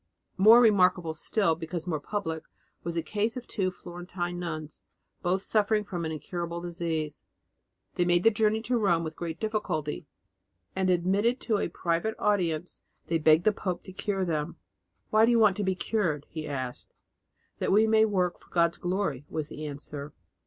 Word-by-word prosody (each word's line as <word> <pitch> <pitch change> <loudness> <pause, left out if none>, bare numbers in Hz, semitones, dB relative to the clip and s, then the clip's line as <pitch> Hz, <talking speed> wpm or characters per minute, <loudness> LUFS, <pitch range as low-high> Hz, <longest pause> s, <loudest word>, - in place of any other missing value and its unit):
More 220 +5 +8
remarkable 180 -7 +4
still 180 +2 +1
because 165 +1 -5
more 160 -4 -1
public 160 -2 -4 0.4
was 170 0 -3
the 165 - 0
case 215 +7 -1
of 250 - -6
two 190 -4 -1
Florentine 175 0 -6
nuns, 155 -3 -5 0.4
both 185 +2 0
suffering 215 0 +2
from 175 -4 -4
an 160 - -2
incurable 170 +2 -4
disease. 165 -3 -3 0.7
They 175 - +1
made 175 0 +3
the 225 - +6
journey 220 +1 +1
to 245 0 +1
Rome 170 -6 +2
with 160 -1 -5
great 165 -2 -5
difficulty, 210 -9 -2 0.7
and 190 0 +1
admitted 195 +8 +2
to 215 -4 0
a - - -1
private 170 +6 -1
audience, 180 -5 0 0.3
they 165 0 +2
begged 155 +1 +5
the 215 - +4
pope 180 -3 -3
to 190 - -10
cure 195 0 -1
them. 155 -1 -2 0.6
"Why 215 +1 +5
do - - +2
you 240 - +4
want 210 -4 +5
to 205 - -1
be 190 -1 +1
cured?" 170 -7 -1
he 155 -1 -5
asked. 130 -4 -5 0.6
"That - - 0
we 215 +3 +5
may 220 0 +5
work 185 -4 0
for - - -22
God's 170 -1 +2
glory," 175 -7 -2
was 155 -2 -3
the 155 0 -6
answer. 145 0 -7
175 Hz, 175 wpm, -28 LUFS, 160-205 Hz, 0.7 s, More